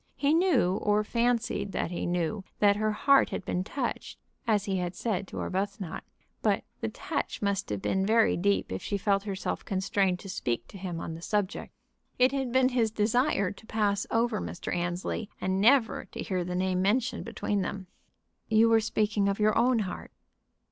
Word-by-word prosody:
He 285 +1 +2
knew, 295 - +3
or 210 0 +2
fancied 230 -3 0
that - - -1
he 175 - -3
knew, 175 +3 -1
that 205 -1 +4
"her 215 +1 0
heart 275 +6 +4
had - - -5
been 180 - -1
touched," 245 +5 -4 0.3
as 210 -2 +2
he 195 -3 -1
had 180 0 -3
said 200 -4 -2
to - - -8
Arbuthnot. 195 -2 -3 0.4
But - - +1 0.2
the - - -2
"touch" - - -4
must 200 -1 0
have 105 -2 -3
been 190 0 +1
very 220 +3 +4
deep 200 - +1
if 95 - -3
she 200 - -2
felt 200 0 +1
herself 195 -2 -3
constrained 190 -1 0
to - - -9
speak 120 -11 -2
to 195 - -10
him 180 -3 -4
on 165 - -5
the 165 - -8
subject. 205 +1 -2 0.5
It 255 0 +5
had 270 -3 -2
been 260 0 +4
his 240 -3 +2
desire 215 -1 +1
to 205 - -13
pass 205 -2 0
over 230 -2 +1
Mr. - - -4
Annesley, 175 +4 -2
and 190 +1 0
never 240 +1 +4
to - - -7
hear 185 -2 -1
the 180 +1 -4
name 185 0 +1
mentioned 230 +5 +1
between 210 -3 -2
them. 190 +1 -4 0.6
"You 220 +1 +5
were 225 -1 +5
speaking 210 -2 +1
of 200 - -2
your 215 0 +3
own 245 +1 +4
heart." 185 - -7
205 Hz, 190 wpm, -29 LUFS, 185-225 Hz, 0.6 s, It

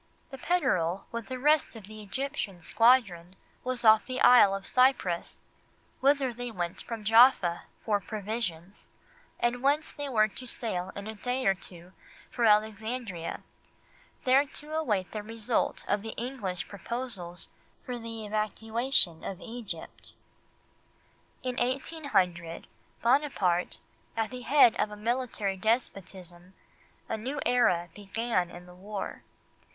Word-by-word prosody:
"The 270 - -8
Petterel 195 - +1
with 235 -1 -5
the 260 - -4
rest 300 0 +2
of 225 - -9
the 215 +1 -10
Egyptian 210 - -4
squadron 205 -7 +3 0.3
was 250 -2 -2
off 220 0 +6
the 255 0 -3
Isle 230 -6 +7
of 195 - -6
Cyprus, 250 -10 +1 0.6
whither 275 -2 +3
they 245 +1 -5
went 175 -6 -4
from 230 -2 -6
Jaffa 225 -6 +5 0.2
for 210 -2 +2
provisions, 200 -3 -5 0.5
and 240 +1 0
whence 290 +3 +2
they 290 -1 -5
were 215 -4 +4
to 250 +4 -8
sail 190 -6 -3
in 200 - -6
a 220 - -5
day 250 +4 -2
or 195 - +5
two 180 -1 -14 0.4
for 240 - +1
Alexandria, 215 -3 0 0.8
there 270 +3 +4
to 300 +3 -9
await 215 - 0
the 215 - -4
result 225 +2 -2
of 205 0 +1
the 225 +1 -6
English 225 -7 -4
proposals 200 -5 -6 0.4
for 250 -1 -4
the 225 -1 -7
evacuation 215 -3 0
of 190 - -5
Egypt." 235 -1 -8 1.3
In 255 -1 -3
1800, 245 - -1
with - - -29
Buonaparte 235 -9 +2 0.4
at 225 +1 0
the 250 -1 -7
head 260 -3 +6
of - - +1
a 210 - -8
military 220 -3 -1
despotism, 185 -5 -3 0.5
a 220 - -2
new 265 +7 -4
era 180 -9 +3
began 205 -2 -1
in 175 +1 -11
the 180 - -14
war. 195 +3 -6
220 Hz, 135 wpm, -29 LUFS, 190-250 Hz, 1.3 s, Isle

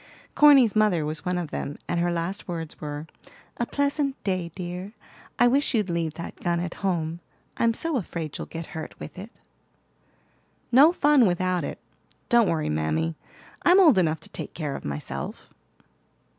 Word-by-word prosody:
Corny's 275 -7 +6
mother 205 -8 +3
was 155 0 -4
one 180 0 0
of 170 -4 -4
them, 145 - -4
and 175 - 0
her 175 0 +1
last 170 +4 -3
words 165 -3 -6
were, 150 0 -5 0.5
"A 235 - -1
pleasant 285 -1 0
day, 185 -3 -1
dear. 180 +2 -6 0.4
I 240 - +5
wish 275 +1 +2
you'd 210 -5 +1
leave 165 -2 -1
that 170 - -8
gun 170 -1 0
at 175 0 -3
home; 170 -4 -1 0.4
I'm 230 -1 +2
so 330 0 -1
afraid 165 - -5
you'll - - -5
get 165 0 -6
hurt 160 -2 -7
with 155 - -9
it.' 215 +5 -11 1.3
"No 280 +7 +8
fun 295 - +4
without 180 0 0
it. - - -4 0.5
Don't 235 -3 +5
worry, 160 -2 0
mammy; 80 +1 -1 0.5
I'm 360 +3 +6
old 310 - +6
enough 160 -3 +1
to - - -14
take - - -6
care 150 -3 -3
of - - -7
myself." 70 +1 -6
180 Hz, 170 wpm, -25 LUFS, 160-235 Hz, 1.3 s, No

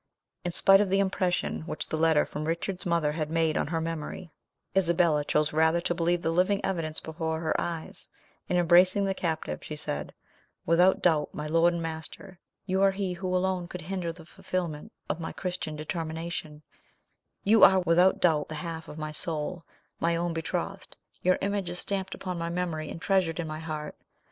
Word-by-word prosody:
In 175 - -1
spite 195 +3 +6
of 205 - +1
the 195 - +3
impression 190 -2 0
which - - -2
the - - -2
letter 160 -1 +3
from 150 +1 -5
Richard's 180 +4 -2
mother 165 -3 +2
had 155 0 -3
made 160 -1 +1
on - - 0
her 165 +1 -1
memory, 165 +1 -5 0.4
Isabella 170 -4 +3
chose 150 +1 +1
rather 160 +2 +4
to 175 - 0
believe 175 0 0
the 165 - +1
living 185 +4 +2
evidence 165 -5 -1
before 160 0 -3
her 160 -1 0
eyes; 165 -2 -4 0.4
and 180 - +2
embracing 180 +3 +5
the 195 - +1
captive, 165 -4 -3
she 155 - -6
said, 75 - -4 0.5
"Without 175 +3 +4
doubt, 155 -4 +2
my 150 - -4
lord 165 +3 +3
and 170 -1 -3
master, 165 +3 -7 0.3
you 190 0 0
are 195 - +6
he 190 -1 -2
who 185 +1 -5
alone 185 -1 0
could 180 0 -7
hinder 175 0 -3
the 165 -1 -13
fulfilment 170 -3 -4 0.2
of - - -2
my 160 - -4
Christian 180 -4 -4
determination; 160 -2 -5 0.8
you 220 +2 +5
are 190 -1 +8
without 180 +2 +4
doubt 155 -4 +3
the 155 - -5
half 165 0 -5
of 150 - -9
my 155 0 -4
soul; 160 +2 -3 0.4
my 170 0 +2
own 170 0 -1
betrothed! 180 +4 -4 0.2
your 185 0 +3
image 200 -2 -1
is 175 - -4
stamped 195 0 -2
upon 180 -2 -5
my 165 0 -2
memory, 170 -3 -2
and 165 - -8
treasured 185 -4 +2
in 170 - -1
my 155 0 -5
heart. 155 -2 -5
170 Hz, 190 wpm, -28 LUFS, 160-185 Hz, 0.8 s, are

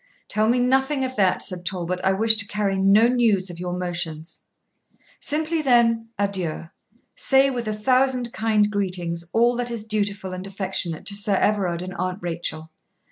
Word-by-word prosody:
'Tell 215 +1 +1
me 245 - +3
nothing 265 +2 +2
of 260 0 -5
that,' 190 -3 +2
said 180 -2 -2
Talbot; 180 0 -3
'I 190 0 +3
wish 220 +3 +4
to 205 -2 0
carry 205 -2 -1
no 195 +4 +5
news 220 -7 +2
of 170 - -10
your 180 0 -3
motions.' 175 -3 -5 0.8
'Simply, 315 +2 -1
then, 235 -4 +3
adieu. 185 -5 -2 0.5
Say, 270 0 +3
with 240 -3 -4
a 215 - -1
thousand 255 +1 +1
kind 215 -2 +1
greetings, 175 -4 -3
all 235 +3 +3
that 245 0 -2
is 230 -3 -4
dutiful 205 -3 -2
and 185 +1 -6
affectionate 190 -4 -2
to 200 - -3
Sir 205 0 +1
Everard 185 -4 0
and 185 +1 -6
Aunt 185 0 -3
Rachel. 165 -2 -5
200 Hz, 170 wpm, -23 LUFS, 180-235 Hz, 0.8 s, no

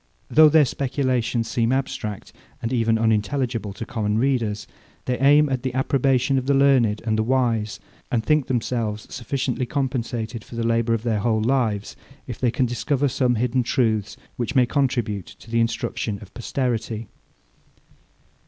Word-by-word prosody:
Though 155 0 +7
their 155 -1 +5
speculations 125 -3 -1
seem 115 0 0
abstract, 120 -6 -3 0.3
and 115 +2 -3
even 115 -2 +2
unintelligible 115 0 0
to 95 - -6
common 110 -4 -1
readers, 115 -5 0 0.4
they 125 -1 -1
aim 145 +3 +5
at 130 -3 -1
the 130 -1 -3
approbation 135 0 +2
of 130 - -7
the 140 - +3
learned 130 -6 +3
and 110 -1 +1
the - - +2
wise; 115 -3 0 0.3
and 115 -2 0
think 150 -3 +2
themselves 115 -3 -2
sufficiently 130 +1 -2
compensated 120 -4 -3
for - - -11
the 115 0 -2
labour 115 0 +2
of 110 - -5
their 115 -3 0
whole 110 0 +1
lives, 115 -5 0 0.3
if 125 - -7
they 125 - +2
can 125 +2 +1
discover 135 +4 0
some 130 -2 +1
hidden 125 +2 +1
truths, 110 -4 0 0.2
which 125 +4 -3
may 130 -2 +5
contribute 120 -7 -1
to 115 - -15
the 115 - +2
instruction 115 -2 -2
of 100 -1 -14
posterity. 115 -3 -2
120 Hz, 160 wpm, -23 LUFS, 110-130 Hz, 0.4 s, Though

